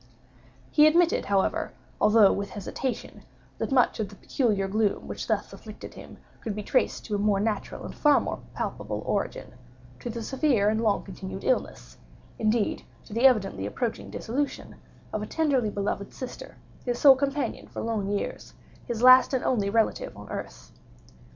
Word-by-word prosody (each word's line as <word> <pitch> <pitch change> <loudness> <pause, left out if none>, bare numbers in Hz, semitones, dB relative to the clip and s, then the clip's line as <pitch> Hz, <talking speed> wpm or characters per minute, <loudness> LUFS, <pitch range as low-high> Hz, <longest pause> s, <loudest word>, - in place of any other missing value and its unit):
He 300 +1 +7
admitted, 335 +2 +3
however, 195 -1 0 0.3
although 210 -1 +6
with 200 0 -3
hesitation, 240 +5 -5 0.4
that - - -2
much 255 -3 +3
of 210 -3 -2
the 200 - -13
peculiar 205 -4 0
gloom 210 +1 0
which - - -5
thus - - -1
afflicted - - -10
him - - -12 0.2
could 215 -3 -4
be 210 - -4
traced 255 - 0
to 215 - -5
a 205 - +1
more 205 -1 +2
natural 210 0 -2
and - - -7
far 295 -1 +4
more - - -4 0.2
palpable - - -4
origin—to - - -5
the 230 0 -5
severe 260 -6 +2
and 220 +1 0
long 215 -3 +1
continued 190 -1 -7
illness—indeed 225 - -2 0.2
to - - -11
the 235 +4 +6
evidently 195 - +1
approaching 230 - -3
dissolution—of 245 -3 -5
a 210 - -4
tenderly 275 -8 +1
beloved 200 -1 -3
sister—his 245 -1 -7
sole 275 0 +8
companion 280 +1 -2
for - - -6
long 220 -3 -1
years—his 220 +3 -5
last 255 +1 +8
and 255 - -1
only 210 -6 +1
relative 225 +1 0
on - - -10
earth. - - -7
225 Hz, 150 wpm, -27 LUFS, 205-260 Hz, 0.4 s, sole